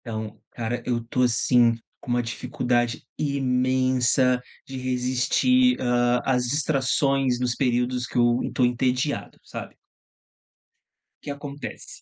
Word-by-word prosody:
Então, 110 -2 -6
cara, 120 +1 -3
eu 120 -2 -1
tô, 125 +2 -1
assim, 120 0 +3 0.2
com - - -12
uma 120 0 +1
dificuldade 120 0 -1 0.2
imensa 130 -2 +2 0.2
de 135 - -7
resistir, 130 - +2
hã, 120 0 +2
às 125 -2 +2
distrações 135 -2 +1
nos 125 -1 0
períodos 125 -1 0
que - - -5
eu 120 0 +3
tô 125 - +3
entediado, 125 +3 -1
sabe. - - -8 1.5
O - - -45
que - - -7
acontece? 140 0 -8
125 Hz, 120 wpm, -24 LUFS, 120-135 Hz, 1.5 s, assim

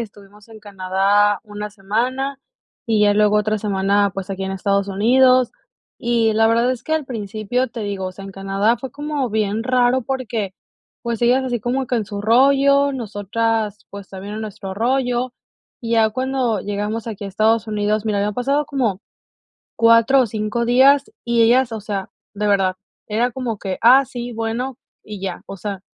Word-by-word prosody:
estuvimos 205 -1 -11
en 220 -1 -13
Canadá 200 +1 +1
1 210 -1 -7
semana, 245 +7 -2 0.5
y 220 -2 +2
ya 205 0 +4
luego 210 0 +3
otra 215 0 +1
semana, 200 -1 +1
pues, 195 0 -5
aquí 195 0 -3
en 190 - -3
Estados 200 +1 0
Unidos. 250 +5 +4 0.5
Y 230 -2 +1
la 225 +1 +4
verdad 235 +2 +2
es 255 - -4
que 315 - -3
al 315 -3 -1
principio, 225 +1 -2
te 230 -1 -8
digo, 200 -3 -3
o 185 - -6
sea, 195 +1 -11
en 195 - -8
Canadá 195 +4 0
fue 260 +1 -8
como 290 -3 -3
bien 215 +1 -1
raro, 255 0 +2
porque, 225 -6 -3 0.5
pues, 235 -1 -3
ellas 250 +2 +3
así 245 -2 -2
como 250 +3 -2
que 250 - +1
en 220 - -1
su 200 0 -6
rollo, 275 +5 +4
nosotras, 220 -2 -2
pues, 200 -1 -9
también 195 +2 -8
en 220 - -5
nuestro 210 -2 -6
rollo. 245 +3 0 0.5
Y 230 -1 -4
ya 220 -1 +4
cuando 255 -2 -1
llegamos 210 +3 -3
aquí 210 -2 -6
a - - -4
Estados 220 +3 +1
Unidos, 210 0 -1
mira, 210 -2 0
había 205 +1 0
pasado 275 +7 0
como 235 -9 -1 0.8
4 230 +3 +5
o 255 - +4
5 215 +2 -2
días, 270 +4 +4
y 235 -1 +2
ellas, 240 +2 +3
o 225 - -4
sea, 200 -2 -4 0.2
de 210 0 -3
verdad, 195 -2 +2 0.3
era 235 +3 0
como 240 -3 -4
que: 190 -2 -4
"Ah, 255 +4 +7
sí, 245 -1 -7
bueno", 230 +3 -3 0.2
y 210 -2 -9
ya, 190 -2 -5
o - - -8
sea, 195 0 -5
220 Hz, 185 wpm, -20 LUFS, 205-245 Hz, 0.8 s, Ah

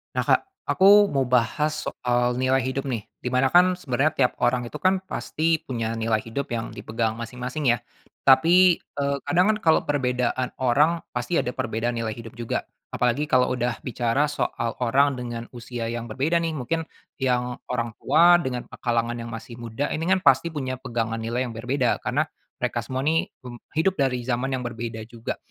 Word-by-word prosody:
Nah - - +1
Kak - - +4 0.3
aku 205 +2 +6
mau 135 -1 +2
bahas 125 +5 +2 0.2
soal 120 0 0
nilai 130 +1 +3
hidup 130 +1 -2
nih, 115 -6 -3 0.2
di 125 - -1
mana 130 +1 +3
kan 180 +1 +5
sebenarnya 140 -1 +1
tiap 125 -2 +3
orang 120 0 +2
itu - - -11
kan 190 0 +3
pasti 165 -3 -1
punya 115 -3 -3
nilai 110 -1 +1
hidup 115 +6 -4
yang 115 -1 -3
dipegang 110 0 -2
masing-masing 125 +4 -2
ya, 120 - 0 0.5
tapi, 170 +6 +6 0.2
eee, 140 0 0
kadang 185 +5 +3
kan - - -4
kalau 160 -1 +4
perbedaan 125 -2 0
orang 145 +7 +3 0.2
pasti 125 +8 0
ada 125 - -2
perbedaan 120 -1 -2
nilai 115 -1 -2
hidup 115 +1 -9
juga. 120 -1 -3 0.2
Apalagi 125 +5 0
kalau 125 -1 +4
udah 120 -1 -2
bicara 125 +3 0
soal 115 -5 -2
orang 135 +3 +3
dengan 120 -1 -5
usia 120 -1 -5
yang 120 0 -4
berbeda 135 +9 -1
nih 165 -1 -1
mungkin, 160 +5 -2 0.4
yang 125 -2 0 0.2
orang 120 -2 -1
tua 170 +5 +6
dengan 130 -7 -3 0.2
kalangan 120 -1 0
yang 115 0 -6
masih 115 +1 -8
muda 120 +4 -3
ini 160 - -2
kan 190 - +4
pasti - - +5
punya 130 -4 -3
pegangan 115 -3 -2
nilai 120 +3 -2
yang 115 - -8
berbeda, 125 +2 0
karena - - 0 0.3
mereka - - -1
semua 130 +1 -4
nih 160 +2 +1 0.5
hidup 180 +4 +3
dari 125 -2 0
zaman 125 +1 -1
yang 130 -2 -2
berbeda 115 -1 -5
juga. 115 0 -6
125 Hz, 180 wpm, -24 LUFS, 120-145 Hz, 0.5 s, aku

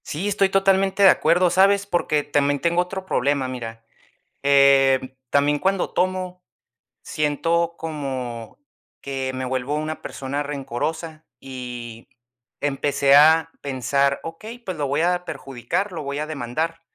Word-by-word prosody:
Sí, 170 +7 -3
estoy 200 -1 +2
totalmente 195 0 +2
de 190 - +9
acuerdo, 175 +2 +3
¿sabes? 200 +2 +4
Porque 170 -6 0
también 145 0 +1
tengo 170 +2 +2
otro 190 +1 -5
problema, 140 -5 0
mira. 115 -3 -7 0.6
Eh, 135 -2 +4
también 145 +2 +2
cuando 190 +2 0
tomo, 185 0 -1 0.6
siento 165 +3 0
como 130 -7 -5 0.4
que, 135 -1 -4
me 130 0 -3
vuelvo 130 +2 -2
una 155 +1 -4
persona 140 +2 -4
rencorosa 150 +3 -4 0.2
y 120 -3 -8 0.5
empecé 140 -1 +2
a 160 +2 +6
pensar, 140 +1 0
okey, 215 +9 -8
pues 190 -7 -6
lo 145 -2 -2
voy 140 +3 0
a 180 +1 +1
perjudicar, 135 - -4
lo 165 - -5
voy 140 0 -4
a 150 - -2
demandar. 155 +3 -3
145 Hz, 135 wpm, -22 LUFS, 135-175 Hz, 0.6 s, de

